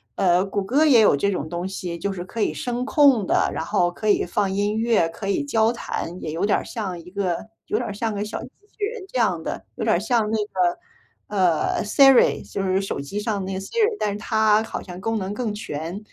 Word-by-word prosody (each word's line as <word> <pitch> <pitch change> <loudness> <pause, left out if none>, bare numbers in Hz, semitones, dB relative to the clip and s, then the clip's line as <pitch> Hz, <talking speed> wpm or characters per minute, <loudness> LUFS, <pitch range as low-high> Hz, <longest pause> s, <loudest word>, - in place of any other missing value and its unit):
呃， 180 0 +3
谷 200 0 -2
歌 275 +10 +3
也 250 -7 +6
有 205 -9 +5
这 200 - +1
种 180 -5 -3
东 175 +2 -3
西， 175 -3 -5
就 200 +2 -2
是 175 -2 -5
可 225 +5 -8
以 - - +1
声 245 0 -3
控 275 - +4
的， - - +2
然 - - -3
后 175 0 +1
可 215 +5 -5
以 - - +3
放 200 -2 0
音 205 +2 0
乐， 225 -7 +2
可 195 +4 -7
以 200 +8 0
交 225 -4 +2
谈， 180 -5 -5
也 155 - -4
有 165 +5 -1
点 205 - +2
儿 - - -7
像 200 -6 -5
一 170 +1 -12
个 190 -2 -2 0.2
有 - - 0
点 230 -3 -3
像 220 +1 -2
一 - - -6
个 205 - -2
小 210 - -5
机 - - -8
器 415 +5 -7
人 450 -1 -6
这 255 - -1
样 180 -8 +1
的， - - -5
有 - - -4
点 170 - +3
像 220 0 +1
那 220 - +1
个， 180 -3 0 0.5
呃 185 -5 +1
，Siri 270 +4 +5
就 195 - -3
是 190 0 +1
手 195 -7 -3
机 140 +9 -5
上 205 -2 -2
那 190 - -4
个 190 - -3
Siri， 430 - 0
但 210 -1 0
是 205 - -4
它 220 0 +2
好 225 - -5
像 180 0 -9
功 225 +2 -1
能 190 +1 -4
更 220 -1 -2
全。 165 -5 -5
呃， 205 - -5
205 Hz, 285 characters per minute, -23 LUFS, 185-225 Hz, 0.5 s, 也